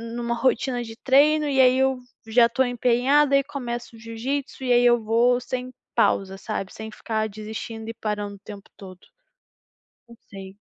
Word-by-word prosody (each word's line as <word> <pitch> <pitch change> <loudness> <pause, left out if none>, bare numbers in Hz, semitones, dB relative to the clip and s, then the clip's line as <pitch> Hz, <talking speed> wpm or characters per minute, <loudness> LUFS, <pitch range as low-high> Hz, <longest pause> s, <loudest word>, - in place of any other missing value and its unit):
numa 235 0 -2
rotina 245 0 0
de 225 -1 -9
treino, 295 +4 +3
e 270 -1 0
aí, 255 0 +5
eu 265 -1 +2 0.3
já 235 +1 +5
estou 235 +3 +1
empenhada 250 +4 +2
e 275 - +1
começo 240 -5 -6
o - - -15
jiu-jitsu, 260 +5 -5
e 250 - 0
aí, 245 0 +4
eu 240 -1 +4
vou 240 +3 +3
sem 255 +1 -5 0.2
pausa 195 0 +1
sabe, 195 -2 -5
sem 220 0 -8
ficar 220 0 -3
desistindo 220 +2 -7
e - - -5
parando 210 -2 -4
o - - -17
tempo 200 0 -11
todo. 185 -2 -12 1.1
Não 235 - -14 0.2
sei. 195 -1 -10
235 Hz, 175 wpm, -24 LUFS, 220-260 Hz, 1.1 s, aí